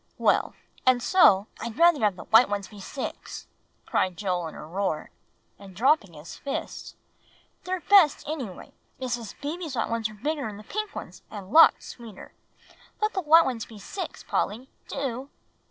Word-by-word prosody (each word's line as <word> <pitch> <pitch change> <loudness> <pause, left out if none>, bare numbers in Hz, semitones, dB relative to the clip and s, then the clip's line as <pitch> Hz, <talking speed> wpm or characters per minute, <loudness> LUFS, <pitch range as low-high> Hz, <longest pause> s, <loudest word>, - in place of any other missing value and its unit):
Well, - - +2 0.3
and 255 -1 +4
so" 210 - +5
"I'd 230 +1 -6
rather 340 -2 +5
have 210 -5 +2
the - - -9
white 225 +1 +5
ones 200 -1 -3
be 210 - -13
six," 260 +7 -6 0.4
cried 185 -2 0
Joel 180 -4 -1
in - - -9
a - - -9
roar, 175 -1 -3 0.5
and 195 -2 -13
dropping 230 - +2
his 150 +2 -10
fists; 280 - -6 0.7
"they're 370 0 -2
best, 375 -7 +5
any 300 -4 -3
way. 180 - -12 0.3
Mrs. 240 -4 -4
Beebe's 310 0 -4
white 230 - -1
ones 230 -1 -1
were 215 - -12
bigger'n 260 -2 -3
the 210 - -11
pink 430 - -5
ones, - - -8
and 200 -2 -9
lots 325 +3 +7
sweeter. 225 -5 -11 0.7
Let 425 +1 0
the 380 - -1
white 325 +1 +6
ones 240 -4 -3
be 220 - -12
six, 365 - -7
Polly, 245 +6 -2 0.2
do!" 270 -1 -4
235 Hz, 170 wpm, -26 LUFS, 200-300 Hz, 0.7 s, lots